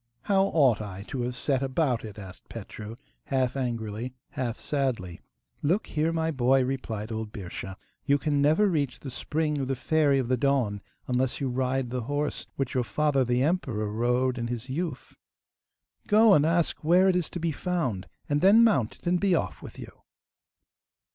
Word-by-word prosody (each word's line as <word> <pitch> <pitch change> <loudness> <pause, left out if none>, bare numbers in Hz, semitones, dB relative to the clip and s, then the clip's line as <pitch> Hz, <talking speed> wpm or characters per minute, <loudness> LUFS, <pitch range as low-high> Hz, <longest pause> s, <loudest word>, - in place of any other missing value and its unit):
'How 195 -1 +3
ought 135 - +3
I 100 -2 -7
to 130 - -3
have 125 +1 -2
set 135 +1 +2
about 135 -2 0
it?' 105 -2 -8
asked 95 -3 -11
Petru, 110 0 -8 0.3
half 130 -2 0
angrily, 120 -1 -3 0.2
half 120 -3 -3
sadly. 125 - -2 0.4
'Look 175 +9 +1
here, 155 +2 0
my 160 0 0
boy,' 130 -1 +3
replied 115 -5 -4
old 110 -1 -4
Birscha. 95 -2 -7 0.3
'You 140 0 +3
can 145 0 0
never 155 +9 +4
reach 145 -8 -1
the 135 - -6
spring 150 +2 -1
of 135 - -2
the 135 - -1
Fairy 145 +1 +2
of 130 -3 0
the 130 +1 +1
Dawn 125 -7 +1 0.3
unless 125 0 0
you 135 - -1
ride 130 0 -1
the 125 0 -2
horse 145 +5 -2
which 135 -2 -2
your 125 - +1
father, 145 +1 +1
the 125 +1 +1
emperor, 130 - -1
rode 125 +3 +1
in 115 - -2
his 120 +1 -5
youth. 160 -1 -4 0.9
Go 215 0 +6
and 150 -2 +4
ask 170 -1 0
where 180 +4 +5
it 185 - +3
is 180 -3 0
to 175 - -5
be 165 0 0
found, 155 - -2 0.2
and 145 0 +1
then 205 +5 +7
mount 135 - +2
it - - -24
and 175 +1 +2
be 195 -2 +3
off 95 - -2
with - - -10
you. - - -11
135 Hz, 185 wpm, -27 LUFS, 120-155 Hz, 0.9 s, then